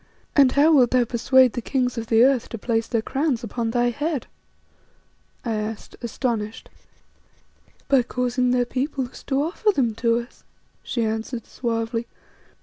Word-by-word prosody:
"And 275 -3 +6
how 300 +3 +5
wilt 255 -5 +5
thou 255 -1 +3
persuade 250 +1 +4
the 240 - -3
kings 250 0 -1
of 230 -1 -4
the 225 +1 +5
earth 260 -2 +2
to 230 - -5
place 225 +1 -1
their 230 -2 -1
crowns 270 -3 -1
upon 230 +1 -3
thy 240 +1 +1
head?" 290 +2 -2 1.2
I 230 - -1
asked, 215 0 -5
astonished. 230 -2 -3 1.2
"By 275 -2 +4
causing 250 +1 -1
their 245 0 +2
peoples 260 0 -3
to 275 +1 +1
offer 365 +7 0
them 260 - +2
to 230 -1 +3
us," 235 +1 -8 0.4
she 235 - -2
answered 225 +2 -3
suavely. 230 -1 -3
245 Hz, 150 wpm, -23 LUFS, 230-265 Hz, 1.2 s, And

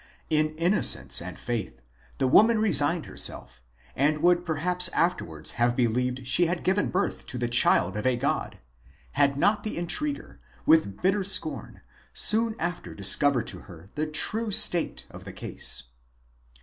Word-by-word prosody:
In 155 0 +1
innocence 175 +6 +1
and - - -8
faith, 115 - -5 0.4
the - - 0
woman 220 - +5
re 215 -1 +1
signed 150 +3 +3
herself, 65 0 -4 0.3
and 150 +3 0
would 175 0 +3
perhaps 180 +3 +1
afterwards 80 - -1
have 120 0 +2
believed 125 +1 -1
she 165 +7 +3
had 175 0 -3
given 190 +2 +1
birth 195 +2 -2
to 130 - -4
the 120 0 -1
child 105 -5 +2
of 105 +4 -2
a 125 -1 +1
god, - - -2 0.5
had 140 -1 +1
not 205 +8 +2
the 215 - -4
intriguer, 285 - -4 0.3
with 155 -12 +2
bitter 195 +2 +2
scorn, 195 +1 -2 0.3
soon 225 +1 +2
after 175 +1 -5
dis - - +5
covered 140 -5 +1
to - - -6
her 90 -2 -14
the 155 +1 -2
true 215 +9 -2
state 175 -4 +1
of - - -11
the - - -9
case. - - -3
155 Hz, 160 wpm, -26 LUFS, 125-180 Hz, 0.5 s, woman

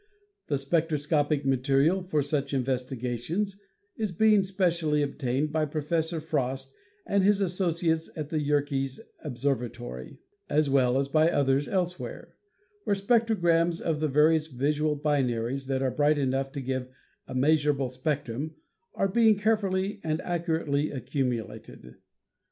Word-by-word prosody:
The 145 - +1
spectroscopic 150 0 0
material 135 +7 +2
for 155 -5 0
such 140 -1 -1
investigations 130 - -2 0.3
is 215 -3 -2
being 210 +3 +4
specially 170 -6 +1
obtained 140 +1 -1
by 155 0 +1
Pro 150 0 -4
fessor 160 +1 0
Frost 135 -4 -2 0.3
and 200 -1 +2
his 205 +1 +4
associates 170 -3 0
at 150 -2 -5
the 155 -2 -1
Yerkes 140 -2 0 0.2
Observatory 120 - -3 0.3
(as 150 -1 +2
well 130 -2 +3
as 135 0 +1
by 155 +3 +3
others 140 -2 +2
elsewhere), 180 -2 -3 0.5
where 200 - +1
spectrograms 190 -6 +2
of 160 -3 -1
the 155 - +1
various 155 +2 +3
visual 150 +2 0
binaries 135 -3 0
that 135 0 0
are 130 - +1
bright 150 +2 +2
enough 135 -1 0
to 140 - -4
give 130 -1 -3 0.4
a - - -7
measurable 145 -1 +2
spectrum 140 +2 -3 0.4
are 195 - +1
being 220 +1 +4
carefully 205 -1 0
and 155 0 -1
accurately 160 -4 -1
accumulated. 115 - -4
150 Hz, 130 wpm, -27 LUFS, 135-170 Hz, 0.5 s, being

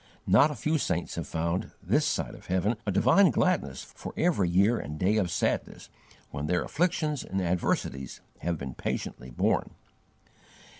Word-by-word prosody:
Not 150 - +6
a 150 - -4
few 155 +2 0
saints 85 -9 -1
have - - -4
found, 85 +3 -2
this - - +1
side - - -1
of - - -13
heaven, 95 +5 +1
a - - +2
divine 190 - +5
gladness 155 - 0
for - - -10
every 155 - +2
year 100 +7 +3
and 75 +1 -6
day 95 +6 +2
of 95 -5 +1
sadness, 85 - -2 0.4
when 70 +2 -4
their 90 +1 +1
afflictions 155 -3 0
and 95 - -3
adversities 85 -6 -1 0.2
have 85 0 -1
been 65 -3 -6
patiently 65 - -4
borne. - - 0
95 Hz, 160 wpm, -28 LUFS, -, 0.4 s, Not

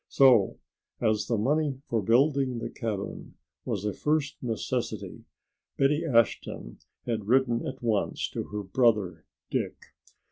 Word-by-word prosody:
So 125 -8 +5 0.4
as 110 -1 +1
the 115 - +1
money 140 +4 +1
for 115 -2 0
building 130 +4 +3
the 115 - -4
cabin 105 -5 -5 0.3
was 105 -4 -2
a 105 - 0
first 150 -2 0
necessity 115 -3 -3 0.5
Betty 145 +4 +3
Ashton 115 - 0 0.3
had 110 -4 -2
written 120 -1 +2
at 130 - -7
once 110 -4 0
to - - -3
her 105 0 -5
brother 100 -6 +1 0.2
Dick. - - -1
115 Hz, 130 wpm, -28 LUFS, 105-135 Hz, 0.5 s, So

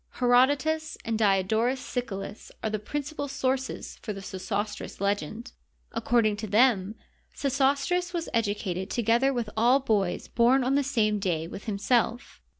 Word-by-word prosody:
Herodotus 285 +6 +2
and 225 -1 -1
Diodorus 220 +4 +2
Siculus 225 -6 -5
are 220 - -1
the 215 - -1
principal 285 +5 -4
sources 265 -1 -2
for 215 - -4
the 195 - -7
Sesostris 200 +2 -4
legend. 205 - -2 0.4
According 225 -2 +1
to 215 +1 -5
them, 215 -2 +3 0.4
Sesostris 280 +6 +1
was 340 -2 -3
educated 205 -4 -1
together 235 +3 +2
with 235 -5 -3
all 240 +5 +4
boys 205 -8 0
bom 250 +3 +3
on 260 +2 +1
the 285 - +3
same 220 -7 +1
day 170 -5 -1
with 195 - -9
himself. 235 +4 0
230 Hz, 140 wpm, -27 LUFS, 205-265 Hz, 0.4 s, all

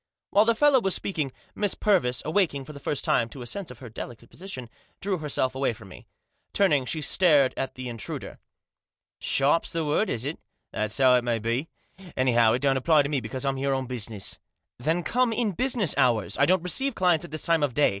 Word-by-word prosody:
While 210 +2 +5
the 230 0 +3
fellow 280 0 +4
was 195 -3 0
speaking, 155 -8 -2 0.2
Miss 205 -2 -1
Purvis, 125 - +1
awaking, 155 -5 0
for 150 - -10
the 140 - -10
first 145 0 -3
time, 115 - +2
to 130 0 -9
a - - -8
sense 195 +9 -5
of 125 - -10
her 125 0 -10
delicate 115 +1 -9
position, 170 -10 -7 0.3
drew 190 -2 -2
herself 135 -4 -1
away 135 -2 0
from 110 -3 -13
me. - - -13 0.5
Turning, 150 -10 +3
she 155 - -3
stared 150 -4 +3
at 135 - -4
the 130 -1 -6
intruder. 115 -2 -6 0.4
" - - -68
Sharp's 140 +4 +2
the 165 -1 -1
word, 150 +9 +1
is 115 +1 -2
it? 150 +3 -4 0.3
That's 110 0 -1
how 130 -2 +5
it 125 -1 +3
may 120 -1 0
be. 115 +7 -2 0.5
Anyhow, 120 -3 +4
it 125 +3 -1
don!t 135 -1 +3
apply 155 +1 +4
to 140 - -3
me, 145 -2 0
because 125 +3 -5
Pm 135 -1 0
here 135 0 0
on 130 0 -2
business.", 115 -5 -4 0.2
" - - -59
Then 160 +7 0
come 250 +3 +1
in 225 -1 0
business 235 - +1
hours. 120 -6 +2
I 140 - +3
don't 185 -1 +3
receive 265 +9 0
clients 175 -3 +2
at 175 - -7
this 155 0 -5
time 165 -2 +2
of 145 -4 0
day. 150 - +4
140 Hz, 225 wpm, -26 LUFS, 125-180 Hz, 0.5 s, While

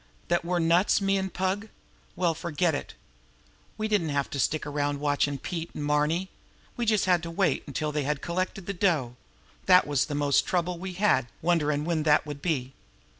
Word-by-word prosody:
That 175 0 +2
we're 175 +1 -1
nuts, 170 +5 +3
me 195 -1 +1
an' 190 0 -2
Pug? 190 +4 -2 0.5
Well, 175 -2 +1
forget 170 +1 0
it! 145 - -5 0.8
We 215 0 -1
didn't 205 -7 +1
have 140 -1 -1
to 140 - -3
stick 155 +3 0
around 145 -1 -1
watchin' 145 -1 +1
Pete 165 +4 -5
an' 150 - -4
Marny; 150 +5 +1 0.4
we 240 -1 -2
just 215 -2 +3
had 180 -2 +3
to 170 - -6
wait 165 -3 +1
until 150 +2 -2
they 150 0 -1
had 145 +1 -1
collected 185 +3 -3
the 200 - -3
dough. 160 -11 +1 0.5
That 180 -1 +7
was 145 -2 +1
the 145 - -3
most 145 -1 +2
trouble 180 -1 -1
we 185 0 -5
had 175 - +2 0.2
wonderin' 150 -3 +1
when 165 -2 0
that 150 -1 +3
would 145 -1 -7
be. 135 -6 -1
165 Hz, 190 wpm, -27 LUFS, 145-185 Hz, 0.8 s, That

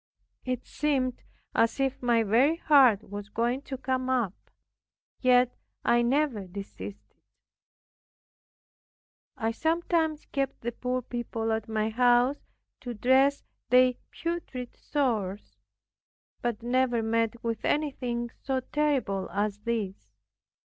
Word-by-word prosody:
It 255 -1 -2
seemed 265 -4 -1 0.3
as 230 +4 +2
if 270 -1 0
my 235 -2 +3
very 245 +9 +4
heart 265 - +5
was 205 +1 -7
going 240 +5 0
to 265 - -3
come 260 0 -1
up; 240 -8 +1 0.9
yet 250 -1 +4 0.3
I 240 0 +4
never 240 -5 +1
desisted. 105 - -9 2.2
I 225 +1 0
sometimes 320 +2 0
kept 275 -1 -2
the 240 - -2
poor 250 +1 -2
people 230 -2 -3
at 220 0 -2
my 220 0 0
house 245 +3 +3 0.3
to 245 -2 -6
dress 265 +5 +3 0.3
their 255 0 +6 0.2
putrid 330 -8 -5
sores; 220 -9 -2 0.8
but 235 -2 -2
never 245 -1 +1
met 230 0 0
with 230 -2 -2
anything 250 -5 -1
so 265 -1 0
terrible 260 -10 0
as 205 0 -1
this. 210 -3 -3
245 Hz, 115 wpm, -28 LUFS, 225-265 Hz, 2.2 s, their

